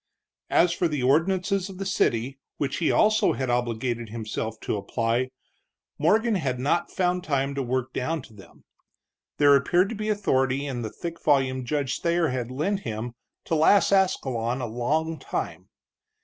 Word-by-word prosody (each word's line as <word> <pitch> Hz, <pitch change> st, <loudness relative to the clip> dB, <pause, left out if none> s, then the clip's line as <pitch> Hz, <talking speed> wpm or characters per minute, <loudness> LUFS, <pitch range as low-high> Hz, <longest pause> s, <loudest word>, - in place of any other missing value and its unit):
As 170 Hz, 0 st, +4 dB
for 175 Hz, -, +1 dB
the 150 Hz, -5 st, -2 dB
ordinances 185 Hz, +7 st, +2 dB
of 190 Hz, -, -9 dB
the 195 Hz, -, -4 dB
city, 130 Hz, -7 st, 0 dB, 0.2 s
which 140 Hz, -2 st, -2 dB
he 165 Hz, -, +1 dB
also 215 Hz, 0 st, +3 dB
had 130 Hz, -2 st, -2 dB
obligated 120 Hz, -1 st, -1 dB
himself 110 Hz, 0 st, -4 dB
to -, -, -2 dB
apply, 115 Hz, +5 st, -1 dB, 0.7 s
Morgan 215 Hz, +9 st, +3 dB
had 135 Hz, -10 st, -1 dB
not 145 Hz, +6 st, +1 dB
found 180 Hz, -1 st, 0 dB
time 140 Hz, -3 st, 0 dB
to 140 Hz, -, -2 dB
work 130 Hz, 0 st, -2 dB
down 155 Hz, +2 st, -2 dB
to 115 Hz, -, -15 dB
them. 100 Hz, -2 st, -16 dB, 0.7 s
There 145 Hz, -1 st, +6 dB
appeared 175 Hz, +8 st, +3 dB
to 230 Hz, -, -4 dB
be 215 Hz, +1 st, -3 dB
authority 135 Hz, -9 st, +1 dB
in 130 Hz, -4 st, -3 dB
the 110 Hz, -, -3 dB
thick 165 Hz, +8 st, -7 dB
volume 130 Hz, -3 st, +2 dB
Judge 140 Hz, -1 st, -1 dB
Thayer 170 Hz, -1 st, +2 dB
had 125 Hz, -2 st, -3 dB
lent 155 Hz, +10 st, -1 dB
him 115 Hz, -, -5 dB, 0.3 s
to -, -, -3 dB
last 165 Hz, +7 st, +4 dB
Ascalon 130 Hz, -11 st, +1 dB
a 125 Hz, -, -2 dB
long 150 Hz, +8 st, -1 dB
time. -, -, -5 dB
140 Hz, 165 wpm, -25 LUFS, 125-175 Hz, 0.7 s, There